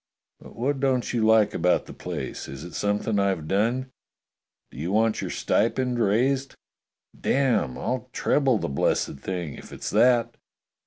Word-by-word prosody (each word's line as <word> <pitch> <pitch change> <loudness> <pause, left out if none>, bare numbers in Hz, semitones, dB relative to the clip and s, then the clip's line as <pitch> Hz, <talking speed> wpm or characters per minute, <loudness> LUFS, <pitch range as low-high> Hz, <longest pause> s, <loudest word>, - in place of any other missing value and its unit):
"But - - -14
what 135 +4 -1
don't 130 -3 0
you 115 -2 +1
like 110 -1 +4
about 90 - +2
the - - -10
place? - - -6
Is 70 +2 -8
it 85 - -9
something 105 +1 0
I've 95 -6 0
done? 120 +8 0 0.8
Do 60 - -10
you 85 +5 -2
want 110 +1 +2
your - - -4
stipend 125 +2 0
raised? 130 +6 +1 0.6
Damme, 125 - +1
I'll 130 -1 -3
treble 135 -3 +2
the - - -3
blessed 70 0 0
thing, 90 -5 -4
if - - -12
it's - - -5
that. 120 -2 +3
110 Hz, 155 wpm, -25 LUFS, 95-130 Hz, 0.8 s, like